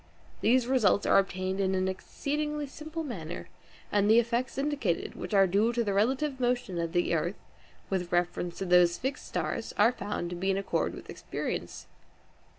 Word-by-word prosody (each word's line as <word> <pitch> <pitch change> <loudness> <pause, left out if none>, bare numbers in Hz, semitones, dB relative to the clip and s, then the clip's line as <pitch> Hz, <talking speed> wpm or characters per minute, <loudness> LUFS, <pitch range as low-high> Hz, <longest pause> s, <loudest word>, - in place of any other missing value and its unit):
These 245 +2 +4
results 235 -6 +3
are - - +6
obtained 190 0 -2
in 190 -1 +1
an 185 0 +1
exceedingly 295 +9 -3
simple 310 +4 -6
manner, 180 - -6 0.4
and 205 0 +3
the 220 - +7
effects 235 +3 +1
indicated, 275 - -1
which - - -7
are 195 -1 +7
due 200 +5 +2
to 235 0 +1
the 205 -3 -1
relative 260 +7 +1
motion 245 -7 0
of 165 0 -2
the 175 -1 +1
earth 170 +4 0 0.5
with 180 -2 -1
reference 175 0 0
to 195 - -3
those 175 -1 +5
fixed 265 +2 -4
stars - - -3
are 220 +3 +6
found 200 -6 -4
to - - -3
be 190 +3 -1
in 195 - +2
accord 200 - -1
with - - -11
experience. - - -5
205 Hz, 175 wpm, -29 LUFS, 185-255 Hz, 0.5 s, the